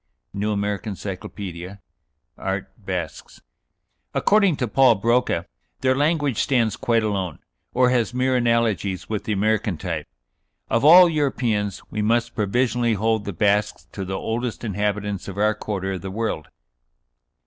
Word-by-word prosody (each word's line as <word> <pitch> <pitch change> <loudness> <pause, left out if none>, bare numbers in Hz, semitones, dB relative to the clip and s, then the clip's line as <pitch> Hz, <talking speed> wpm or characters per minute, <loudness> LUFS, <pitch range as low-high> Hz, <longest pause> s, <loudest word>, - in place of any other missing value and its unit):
("New 105 +2 -1
American 100 0 -2
Cyclopædia," 95 -1 -7 0.6
art. 95 0 -4
Basques.) 95 -6 -6 0.8
"According 200 -5 +4
to 125 -3 -2
Paul 130 +4 +5
Broca 115 -4 +1 0.4
their 130 0 +3
language 145 -3 +1
stands 120 -6 +2
quite 115 -4 +1
alone, 95 -7 -2 0.3
or 125 0 +3
has 120 -3 +1
mere 130 +1 +1
analogies 110 -7 0
with 110 -1 -3
the 110 - -2
American 105 -2 0
type. 80 -4 -4 0.6
Of 115 - +2
all 175 +4 +9
Europeans, 120 - -1
we 105 - -2
must 115 +2 +1
provisionally 120 +2 +1
hold 110 +1 0
the 100 - -3
Basques 100 -4 +1
to 100 - -7
be - - -3
the 95 0 -2
oldest 120 +3 -3
inhabitants 105 -2 -2
of 100 0 -7
our 105 +1 +3
quarter 100 -2 -4
of 95 -2 -4
the 95 - -5
world." 105 -6 -3
105 Hz, 145 wpm, -23 LUFS, 100-120 Hz, 0.8 s, all